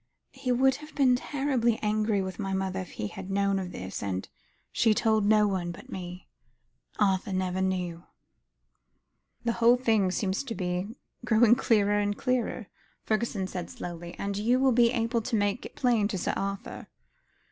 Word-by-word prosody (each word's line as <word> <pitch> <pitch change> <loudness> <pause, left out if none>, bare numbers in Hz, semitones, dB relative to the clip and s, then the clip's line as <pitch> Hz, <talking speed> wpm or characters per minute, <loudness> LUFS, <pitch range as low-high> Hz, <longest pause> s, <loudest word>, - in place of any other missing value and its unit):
He 255 - -3
would 265 +2 +3
have 300 0 -13
been 265 -3 +4
terribly 255 -4 0
angry 210 -1 +1
with 190 +2 -6
my 195 -2 -2
mother 190 0 -2
if 185 - -7
he - - -4
had 185 - -8
known 200 0 +1
of 180 -1 -5
this, 95 +1 -6
and 95 -2 -3 0.4
she 225 -2 +3
told 220 -2 +2
no 210 -1 +5
one 185 -3 -2
but 170 - -12
me. 180 0 -7 0.7
Arthur 195 -2 +1
never 185 0 -1
knew." 180 -3 -2 1.4
"The 235 - +1
whole 240 +2 +6
thing 220 -6 +2
seems 190 +4 -1
to 230 -4 -4
be 180 +4 -3 0.3
growing 235 -1 +5
clearer 205 -4 +3
and 205 0 -1
clearer," 250 -3 -1 0.4
Fergusson 215 -3 -1
said 180 -2 -5
slowly, 175 0 -7
"and 200 0 -3
you 235 +5 +2
will 265 0 +4
be 235 -1 +5
able 230 0 0
to 230 +2 -2
make 205 +2 0
it - - -21
plain 235 -5 +2
to 200 - -3
Sir - - -1
Arthur." 195 0 -4
205 Hz, 170 wpm, -28 LUFS, 190-235 Hz, 1.4 s, whole